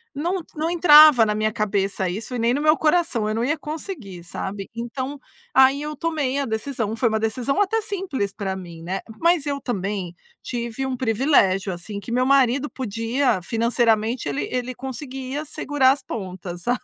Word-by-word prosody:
Não 345 +4 -2
não 315 +2 -1
entrava 305 -7 +8
na 210 - 0
minha 215 0 0
cabeça 200 -3 -1
isso 220 +7 -4
e - - -2
nem 235 +2 +2
no 285 - -1
meu 305 +1 +4
coração, 305 -9 +1
eu 215 - -1
não 230 +2 -1
ia 295 +5 0
conseguir, 295 - -7
sabe. 195 +3 -6
Então 260 +4 -5 0.3
aí 265 +2 +5
eu 300 0 -4
tomei 290 -4 -1
a 280 - 0
decisão, 220 -1 -3
foi 230 0 +2
uma 220 - 0
decisão 235 - -1
até 435 +3 +2
simples 365 - -3
para 195 -2 -4
mim, 170 -3 -9
né, 190 +3 -3 0.2
mas 335 -3 +3
eu 280 -1 -1
também 195 -7 -3 0.3
tive 235 +1 -4
um 260 -1 -2
privilégio, 220 -6 +2
assim, 200 +4 -6
que 205 +4 -9
meu 250 +1 +2
marido 275 +1 +3
podia, 230 -1 -1
financeiramente 230 - +1
ele 140 0 -2
ele 250 0 -3
conseguia 265 +2 -6
segurar 275 -2 +2
as 275 - -2
pontas, 185 -4 -6
sabe. 245 - +1
245 Hz, 180 wpm, -23 LUFS, 210-285 Hz, 0.3 s, entrava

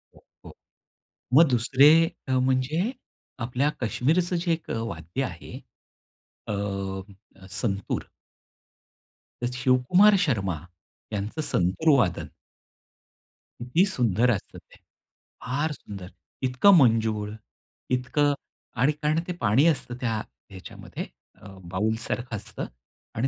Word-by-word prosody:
हो, - - -21 0.2
हो. - - -11 0.8
मग 165 +4 +7
दुसरे 130 +4 +5 0.4
अ, - - -2
म्हणजे 130 - +1 0.5
आपल्या 125 +5 0
कश्मीरचं 165 +10 +1
जे 170 0 0
एक 160 - -6
वाद्य 115 0 -3
आहे. 85 -9 -7 0.9
अ, 105 - -2 1.0
संतूर 100 0 -2 1.4
तर - - +2
शिवकुमार 130 +12 +4
शर्मा 100 - 0 0.6
यांचं 105 +10 -3
संतूर 95 - +1
वादन 95 -8 0 1.3
किती 125 +11 +2
सुंदर 125 - +2
असतं 105 - -4
ते - - -17 0.6
फार 145 +5 -1
सुंदर 100 -9 -8 0.4
इतकं 130 +11 +5
मंजूळ 110 -5 +2 0.6
इतकं 145 +3 +1 0.5
आणि 145 +3 +5
कारण 155 +2 +2
ते 180 - -2
पाणी 115 +10 +4
असतं 135 -6 0
त्या 115 -3 0 0.3
ह्याच्यामध्ये 95 -2 -8 0.4
अ, - - -12 0.2
बाऊलसारखं 110 +4 -2
असतं 110 +2 -6 0.5
आणि 120 +5 +1
125 Hz, 105 wpm, -26 LUFS, 110-150 Hz, 1.4 s, मग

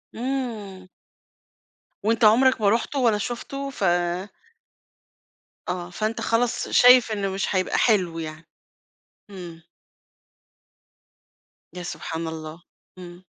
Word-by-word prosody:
إمم. 225 -7 -4 1.2
وأنت 225 +2 +1
عُمرك 250 +3 +5
ما 205 - +4
رُحته 235 +6 0
ولا 230 -4 +3
شُفته 275 +5 -5
ف 265 - -6 1.9
آه. 175 -1 -4
فأنت 215 +5 -3
خلاص 235 +1 0
شايف 250 -2 +6
إنه 200 -2 -1
مش 195 +1 -2
هيبقى 185 0 0
حلو 185 -8 +2
يعني. 155 0 -7 0.8
إمم. 170 -4 -10 2.1
يا 180 - -7
سبحان 165 -2 -5
الله! 160 +1 -7 0.4
إمم. 175 0 -11
200 Hz, 100 wpm, -24 LUFS, 175-235 Hz, 2.1 s, شايف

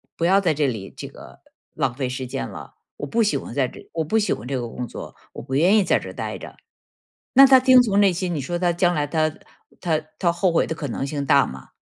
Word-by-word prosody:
不 165 - -1
要 190 +3 +4
在 175 -5 +1
这 145 -1 0
里 110 -6 -5
这 - - -7
个 - - -14 0.3
浪 130 -3 -1
费 130 +1 -3
时 130 +1 -5
间 60 - -4
了， - - -11 0.2
我 145 - -5
不 230 +11 0
喜 210 - +1
欢 - - -8
在 135 -3 +1
这 - - -14
我 165 - -1
不 165 +9 0
喜 215 -1 +1
欢 110 - -8
这 135 -1 -2
个 120 - -4
工 125 +2 -6
作， - - -9 0.2
我 - - -8
不 130 - -4
愿 180 +9 +4
意 210 - +4
在 - - +2
这 - - -9
儿 - - -9
待 - - -5
着。 - - -11 0.8
那 270 +1 +8
他 265 -1 +7
听 255 0 +6
从 205 -4 +1
内 200 -2 +5
心， 175 0 -3
你 145 - -2
说 175 +6 -3
他 175 -1 +1
将 175 0 +2
来 145 -1 -1
他 155 +1 0 0.5
他 160 -3 0 0.2
他 170 - +2
后 175 +1 +1
悔 165 - +1
的 160 - -3
可 155 -2 -5
能 135 +2 -3
性 140 0 -3
大 140 -1 +4
吗？ 65 0 -10
160 Hz, 290 characters per minute, -22 LUFS, 135-185 Hz, 0.8 s, 那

